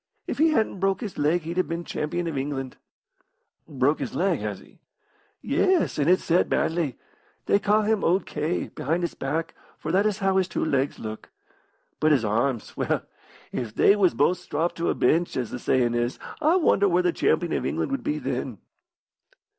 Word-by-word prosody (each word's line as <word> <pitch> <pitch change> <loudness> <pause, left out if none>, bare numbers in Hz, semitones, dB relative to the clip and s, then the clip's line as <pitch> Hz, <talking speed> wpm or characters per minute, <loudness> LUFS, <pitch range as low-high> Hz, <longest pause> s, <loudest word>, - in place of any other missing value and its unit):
If - - -4
he 320 +1 +5
hadn't 220 -10 0
broke 195 +3 +1
his 215 -5 -6
leg 155 +4 +2
he'd 170 +2 -5
have 185 - +1
been 170 +1 -3
champion 175 +3 -3
of 165 -3 -3
England." 135 -1 -3 0.9
"Broke - - +1
his - - -4
leg, - - +1
has - - -4
he?" - - -19 0.6
"Yes, 370 - +2
and 145 +3 +2
it 185 - +5
set 175 +1 +1
badly. 160 -6 0 0.5
They 200 - +3
ca' 210 +1 +2
him 215 -1 +1
owd 180 +2 +2
K, 155 +4 -2
behind 165 +6 -2
his 170 - -2
back, 155 +5 -3 0.2
for - - -4
that 200 +3 +3
is 210 -2 -1
how 195 -2 +1
his 190 -2 +2
two - - -2
legs 140 -2 0
look. 110 0 -7 0.7
But 155 0 +4
his 125 -6 +2
arms 115 +3 -1
well, - - -1 0.5
if 115 -4 -4
they 200 - +5
was 195 -4 +3
both 180 0 +2
stropped 165 0 -2
to 170 - 0
a - - +1
bench, 170 +2 +1
as 125 -3 -2
the 125 - -5
sayin' 120 -2 +1
is, 120 +1 -1 0.2
I 320 +3 +4
wonder 200 - +3
where 180 0 +2
the 175 -1 +2
champion 175 -2 +1
of - - -1
England - - -2
would 275 - -2
be 300 0 -1
then." - - -3
170 Hz, 195 wpm, -25 LUFS, 140-195 Hz, 0.9 s, he